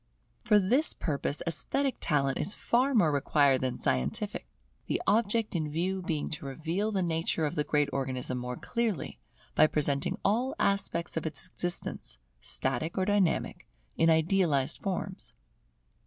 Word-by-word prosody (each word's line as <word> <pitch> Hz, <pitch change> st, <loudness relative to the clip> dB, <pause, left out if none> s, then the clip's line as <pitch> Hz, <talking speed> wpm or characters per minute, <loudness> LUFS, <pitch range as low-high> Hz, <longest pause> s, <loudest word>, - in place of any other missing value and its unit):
For 225 Hz, -3 st, +5 dB
this 240 Hz, +11 st, +2 dB
purpose 145 Hz, -1 st, -1 dB
esthetic 270 Hz, -, -1 dB
talent 140 Hz, -3 st, +1 dB
is 205 Hz, -, -2 dB
far 255 Hz, +3 st, +2 dB
more 175 Hz, -9 st, +5 dB
required 140 Hz, -1 st, +3 dB
than 130 Hz, -1 st, -1 dB
scientific, 70 Hz, -, -1 dB, 0.4 s
the -, -, 0 dB
object 220 Hz, -1 st, +2 dB
in 155 Hz, -3 st, 0 dB
view 185 Hz, +5 st, -1 dB
being 160 Hz, -4 st, -2 dB
to 150 Hz, -2 st, -4 dB
reveal 165 Hz, +10 st, -2 dB
the 195 Hz, -3 st, 0 dB
nature 165 Hz, -1 st, 0 dB
of 150 Hz, -, -1 dB
the 150 Hz, -, 0 dB
great 145 Hz, -1 st, +2 dB
Organism 130 Hz, -2 st, -2 dB
more 125 Hz, 0 st, -4 dB
clearly, 230 Hz, -, -2 dB, 0.3 s
by -, -, +6 dB
presenting 145 Hz, -2 st, 0 dB
all 240 Hz, +6 st, +1 dB
aspects 195 Hz, -4 st, 0 dB
of 160 Hz, -, -1 dB
its 145 Hz, 0 st, -6 dB
existence, 175 Hz, -, -4 dB, 0.2 s
static 135 Hz, -, -2 dB
or 190 Hz, -, +2 dB
dynamic, 205 Hz, -4 st, +1 dB, 0.3 s
in 165 Hz, -, +4 dB
idealized 160 Hz, -4 st, +2 dB
forms. 190 Hz, -1 st, -4 dB
165 Hz, 145 wpm, -30 LUFS, 145-200 Hz, 0.4 s, by